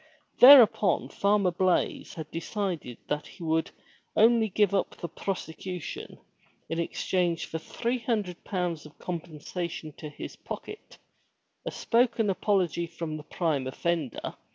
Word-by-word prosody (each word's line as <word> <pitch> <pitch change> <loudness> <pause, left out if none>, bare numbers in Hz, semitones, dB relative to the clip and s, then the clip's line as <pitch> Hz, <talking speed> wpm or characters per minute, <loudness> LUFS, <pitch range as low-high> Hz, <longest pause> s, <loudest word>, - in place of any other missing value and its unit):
Thereupon 245 -6 +8
Farmer 200 -2 +2
Blaize 185 +1 0
had 155 -2 -7
decided 170 - -3
that 150 0 -2
he - - -11
would 160 0 +1 0.5
only 225 0 +5
give 200 0 +2
up 195 - 0
the 170 - -5
prosecution 180 -1 -5 0.5
in 165 - -2
exchange 175 0 0
for 160 - -5
three 240 +9 -2
hundred 210 -7 -2
pounds 175 -5 -2
compensation 165 -1 -5
to 155 - -7
his 150 - -8
pocket, 425 - -8 0.7
a - - -1
spoken 230 -3 +2
apology 185 -4 +1
from 165 -2 -5
the 155 - -7
prime 150 -6 -1
offender. 155 -1 -2
175 Hz, 125 wpm, -28 LUFS, 160-205 Hz, 0.7 s, Thereupon